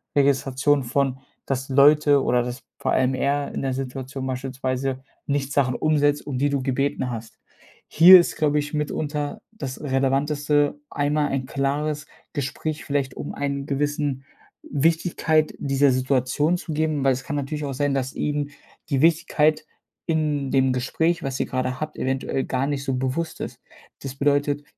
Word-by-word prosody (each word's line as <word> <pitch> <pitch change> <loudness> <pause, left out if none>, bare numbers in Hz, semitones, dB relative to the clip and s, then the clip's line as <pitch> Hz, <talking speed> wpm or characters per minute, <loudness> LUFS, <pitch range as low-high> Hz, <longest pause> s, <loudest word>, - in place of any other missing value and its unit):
Registration 140 0 +2
von, 135 +1 0 0.3
dass 135 0 -2
Leute 145 +1 +5
oder 125 0 +2
dass 125 +2 -6 0.2
vor - - 0
allem 130 0 +2
er 140 +2 -1
in - - -3
der 135 -1 -1
Situation 130 0 -5
beispielsweise 130 0 -3 0.2
nicht 140 -1 -1
Sachen 130 -3 +2
umsetzt, 145 -1 +1
um 140 -3 -3
die 145 +2 +2
du 140 -2 0
gebeten 135 -1 -1
hast. 115 -1 -7 0.5
Hier 180 +3 +9
ist, 175 - -1
glaube 150 -1 +2
ich 145 +1 -4
mitunter 150 0 -2
das 140 -12 -6
Relevanteste, 145 +2 +1
einmal 145 0 0
ein 135 -1 -2
klares 145 +3 -2 0.3
Gespräch, 150 +2 -3
vielleicht 140 -2 -1
um - - -6
einen 140 -1 -3
gewissen 145 -1 -1 0.5
Wichtigkeit 160 +1 +1
dieser 140 0 +3
Situation 130 +5 +1
zu 160 - -6
geben, 155 -2 0
weil 135 -1 +4
es 130 +1 -6
kann 145 - -3
natürlich 150 +2 -3
auch 140 - -3
sein, 145 +1 0
dass 130 -1 -2
ihm 145 -1 -2 0.4
die 135 -3 +1
Wichtigkeit 155 -1 +3 0.4
in 150 -4 0
dem 130 -1 +3
Gespräch, 160 +7 0
was 135 -1 -3
ihr - - 0
grade 130 0 -2
habt, 155 0 -4
eventuell 130 0 -1
gar 130 +1 -1
nicht 140 -1 -2
so 135 - -1
bewusst 135 +6 -2
ist. - - -6 0.4
Das 135 -1 -6
bedeutet, 145 +1 +1
140 Hz, 160 wpm, -23 LUFS, 130-150 Hz, 0.5 s, Hier